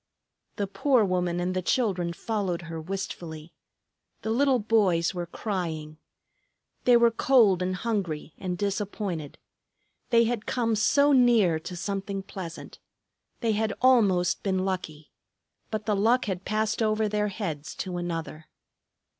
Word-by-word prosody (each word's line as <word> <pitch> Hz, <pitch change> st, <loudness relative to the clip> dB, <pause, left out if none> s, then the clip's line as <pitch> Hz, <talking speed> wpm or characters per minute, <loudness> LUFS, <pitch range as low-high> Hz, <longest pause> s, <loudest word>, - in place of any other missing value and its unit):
The 205 Hz, -, -1 dB
poor 240 Hz, +3 st, +2 dB
woman 180 Hz, -2 st, 0 dB
and 180 Hz, +1 st, -1 dB
the 185 Hz, -, 0 dB
children 185 Hz, -6 st, 0 dB
followed 185 Hz, -2 st, -2 dB
her 165 Hz, -1 st, -6 dB
wistfully. 170 Hz, -3 st, -6 dB, 0.7 s
The 220 Hz, -, -1 dB
little 270 Hz, +2 st, +3 dB
boys 205 Hz, -7 st, +2 dB
were 175 Hz, -1 st, -4 dB
crying. 160 Hz, -6 st, -4 dB, 0.9 s
They 245 Hz, -1 st, +7 dB
were 235 Hz, 0 st, +5 dB
cold 225 Hz, -6 st, +4 dB
and 185 Hz, 0 st, -1 dB
hungry 180 Hz, -8 st, -3 dB
and 180 Hz, -2 st, -3 dB
disappointed. 200 Hz, -5 st, -3 dB, 0.7 s
They 235 Hz, -1 st, +5 dB
had 230 Hz, -1 st, -2 dB
come 230 Hz, -3 st, 0 dB
so 280 Hz, +7 st, +4 dB
near 235 Hz, -, +4 dB
to 180 Hz, +3 st, -7 dB
something 195 Hz, +1 st, -3 dB
pleasant. 175 Hz, -4 st, -8 dB, 0.6 s
They 230 Hz, -2 st, +1 dB
had 215 Hz, 0 st, 0 dB
almost 205 Hz, -9 st, +3 dB
been 190 Hz, -1 st, 0 dB
lucky; 160 Hz, -6 st, -4 dB, 0.6 s
but 215 Hz, -1 st, -4 dB
the 210 Hz, -, +1 dB
luck 230 Hz, +6 st, +3 dB
had 190 Hz, -3 st, -4 dB
passed 215 Hz, +2 st, 0 dB
over 215 Hz, 0 st, +2 dB
their 210 Hz, 0 st, 0 dB
heads 165 Hz, -8 st, -5 dB
to 180 Hz, -1 st, -4 dB
another. 165 Hz, -2 st, -5 dB
195 Hz, 140 wpm, -27 LUFS, 175-220 Hz, 0.9 s, They